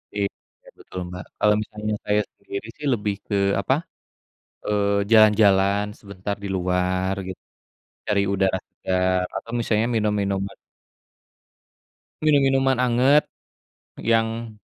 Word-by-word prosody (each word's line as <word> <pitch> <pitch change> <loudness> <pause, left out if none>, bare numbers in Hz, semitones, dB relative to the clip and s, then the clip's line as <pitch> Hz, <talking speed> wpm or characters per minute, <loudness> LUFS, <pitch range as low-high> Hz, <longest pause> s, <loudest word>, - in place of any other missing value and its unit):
iya, 100 -1 +1 0.5
betul, 95 - -8
Mbak. 90 +1 -7 0.2
Kalau 105 - +4
misalnya 105 0 -4
saya 105 0 +2 0.2
sendiri 100 +2 -7
sih, 150 - -7
lebih 105 -3 -1
ke, 105 - -1 0.3
apa, 115 - +1 0.9
eee, 100 -1 +1
jalan-jalan 100 -2 +5
sebentar 100 0 -5
di - - -3
luar, 90 +1 0
gitu. 95 - -7 0.7
Cari 100 -1 +2
udara 95 -1 +1
segar, 95 0 0
atau 115 +4 -8
misalnya 115 -1 +1
minum 105 -1 +1
minuman 100 0 -2 1.7
minum 150 -2 +5
minuman 135 -1 +2
anget 125 +4 +4 0.8
yang 115 0 0
105 Hz, 115 wpm, -23 LUFS, 95-115 Hz, 1.7 s, jalan-jalan